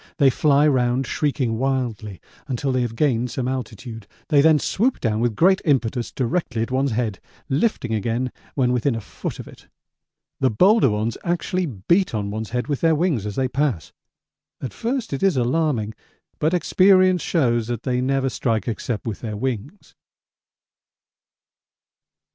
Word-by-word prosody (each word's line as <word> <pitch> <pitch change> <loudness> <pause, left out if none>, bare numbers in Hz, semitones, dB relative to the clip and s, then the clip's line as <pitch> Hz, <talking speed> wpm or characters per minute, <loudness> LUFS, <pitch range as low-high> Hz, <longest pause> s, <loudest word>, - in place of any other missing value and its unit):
They 140 -4 +5
fly 145 +2 +3
round 130 -1 +1
shrieking 130 -6 -1
wildly 120 -7 -2 0.3
until 135 +1 -1
they 130 -1 +1
have 120 -2 -3
gained 125 -3 +1
some 125 +1 -3
altitude. 115 -3 -5 0.2
They 145 -2 +5
then 160 +1 +5
swoop 235 - 0
down 110 -2 0
with 120 -2 0
great 190 - +4
impetus 125 -5 0
directly 125 -3 -1
at 115 - -6
one's 130 -1 +1
head, 110 -4 -2 0.3
lifting 135 - 0
again 115 +4 -1 0.2
when 125 -3 +2
within 125 +1 +1
a - - -2
foot 100 - -6
of - - -9
it. - - -15 0.7
The 130 - +3
bolder 185 - +4
ones 110 +2 -2
actually 175 +1 -1
beat 140 - +1
on 100 -1 -2
one's 110 +1 -4
head 125 +1 -2
with 145 -3 -3
their 165 -1 +4
wings 150 - 0
as 105 - -5
they 130 -1 +1
pass. 130 - -1 0.7
At 125 -7 -6
first 235 - -3
it 135 - -3
is 195 -7 +2
alarming, 125 -4 0 0.5
but 160 +4 +2
experience 185 0 +4
shows 120 -8 +1
that 120 -1 -4
they 125 -1 0
never 135 +1 +1
strike 115 -3 -1
except 110 -1 -3
with 110 -4 -4
their 110 -3 -4
wings. 130 - -5
130 Hz, 160 wpm, -22 LUFS, 115-150 Hz, 0.7 s, They